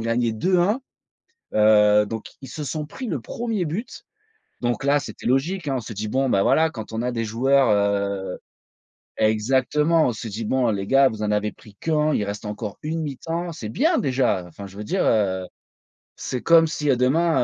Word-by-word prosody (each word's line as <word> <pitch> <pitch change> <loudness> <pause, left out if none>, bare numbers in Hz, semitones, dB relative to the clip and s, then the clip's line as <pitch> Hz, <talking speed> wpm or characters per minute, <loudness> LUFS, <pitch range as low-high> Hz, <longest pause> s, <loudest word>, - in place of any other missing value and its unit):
gagné 115 0 0
2-1. 185 - +1 0.7
Heu, 105 -1 +5
donc 110 +1 -6 0.2
ils 135 - -9
se 150 +2 -6
sont 150 +1 -3
pris 255 - -8
le 150 - -2
1er 225 - -3
but, 175 +10 -5 0.6
donc 120 0 -1
là 145 +1 +3
c'était - - -9
logique, 150 +8 0
hein, 135 -2 0
on - - -1
s'est 110 0 -8
dit: 105 +2 -3
«Bon 135 +2 +1
ben, 100 -3 +3
voilà, 160 0 +3
quand 110 -7 -8
on 110 - -2
a 125 0 -1
des 115 -1 -2
joueurs, 130 +4 +3
heu». 100 -2 0 0.8
Exactement, 130 +9 +2
on 125 - +1
se 110 +1 -6
dit: 110 +2 -5
«Bon, 125 0 +2
les 100 -2 -2
gars 135 +2 +5
vous 110 -2 -7
en 105 - 0
avez 105 0 0
pris 105 - -17
qu'1, 155 -1 +1
il 105 - 0
reste 100 +1 -5
encore, 105 0 -5
1 160 +2 -2
mi-temps 165 +4 -4
c'est 115 -9 -7
bien 320 - +2
déjà», 125 - +1
enfin, 100 +4 -10
je 100 +1 -12
veux 105 - -5
dire, 185 - 0
heu 95 -4 +1 0.7
c'est 125 - -4
comme 165 -1 +6
si, 150 -2 -2
heu, - - +3
demain, 160 +3 +2
125 Hz, 200 wpm, -23 LUFS, 105-155 Hz, 0.8 s, comme